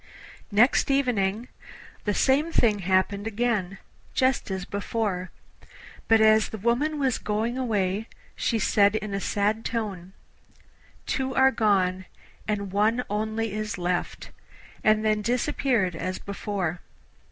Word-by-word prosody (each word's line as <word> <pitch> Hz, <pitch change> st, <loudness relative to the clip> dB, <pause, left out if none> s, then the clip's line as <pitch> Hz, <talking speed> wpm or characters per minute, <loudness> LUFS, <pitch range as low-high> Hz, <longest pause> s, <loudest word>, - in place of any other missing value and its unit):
Next 230 Hz, +8 st, +4 dB
evening 240 Hz, -5 st, +1 dB, 0.6 s
the 205 Hz, -, +1 dB
same 290 Hz, +5 st, +2 dB
thing 215 Hz, -9 st, +3 dB
happened 195 Hz, +3 st, +1 dB
again, 215 Hz, -4 st, -1 dB, 0.4 s
just 260 Hz, -3 st, +1 dB
as 190 Hz, -1 st, -3 dB
before, 200 Hz, -2 st, -2 dB, 0.8 s
but 225 Hz, 0 st, +5 dB
as 220 Hz, 0 st, +5 dB
the 220 Hz, -, -6 dB
woman 240 Hz, +9 st, 0 dB
was 265 Hz, -3 st, +1 dB
going 220 Hz, +3 st, -1 dB
away 215 Hz, -4 st, -1 dB, 0.3 s
she 230 Hz, -, 0 dB
said 205 Hz, 0 st, +3 dB
in 215 Hz, -2 st, -3 dB
a 195 Hz, -, -1 dB
sad 210 Hz, +3 st, 0 dB
tone, 195 Hz, -6 st, -4 dB, 0.9 s
'Two 265 Hz, -1 st, -2 dB
are 265 Hz, 0 st, +5 dB
gone, 190 Hz, -5 st, +1 dB, 0.4 s
and 200 Hz, -2 st, -2 dB
one 220 Hz, +5 st, +2 dB
only 220 Hz, +1 st, -2 dB
is 215 Hz, 0 st, -3 dB
left,' 175 Hz, 0 st, -3 dB, 0.5 s
and 215 Hz, 0 st, +3 dB
then 215 Hz, -1 st, +2 dB
disappeared 240 Hz, -, 0 dB
as 185 Hz, +3 st, -3 dB
before. 195 Hz, -4 st, -4 dB
215 Hz, 125 wpm, -26 LUFS, 195-235 Hz, 0.9 s, but